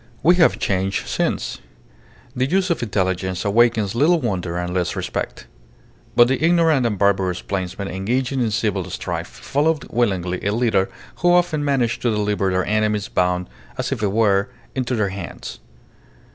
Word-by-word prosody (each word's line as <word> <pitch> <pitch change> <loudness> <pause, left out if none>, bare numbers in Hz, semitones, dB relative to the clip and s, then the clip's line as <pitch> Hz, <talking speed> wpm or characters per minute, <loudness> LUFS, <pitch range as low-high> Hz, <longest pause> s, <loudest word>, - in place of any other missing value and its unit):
We 175 +3 +5
have 170 - +4
changed 95 0 -1
since. - - -1 0.8
The 130 +1 +1
use 185 +3 +1
of 170 - 0
intelligence 95 -3 -1
awakens 110 -1 +3
little 155 +8 +3
wonder 90 - -2
and 90 0 -3
less 90 -2 -1
respect. - - -4 0.7
But 120 - +7
the 135 +4 0
ignorant 165 -6 +4
and 105 -3 -2
barbarous 95 -2 +1
plainsmen 95 0 -3
engaging 125 +8 -1
in 115 - +1
civil 110 -2 -1
strife - - -4
followed 150 +1 -1
willingly 95 -6 0
a 100 - 0
leader 110 -5 +2 0.3
who 175 -1 +3
often 175 -4 +2
managed 130 -5 0
to 120 - +1
deliver 105 -2 0
their 95 0 0
enemies 105 -1 0
bound, 90 0 0 0.3
as 130 0 -2
it 130 -5 -2
were, 100 -1 +2 0.2
into 130 -1 -1
their 105 -3 +1
hands. 95 -2 -7
110 Hz, 155 wpm, -21 LUFS, 95-130 Hz, 0.8 s, But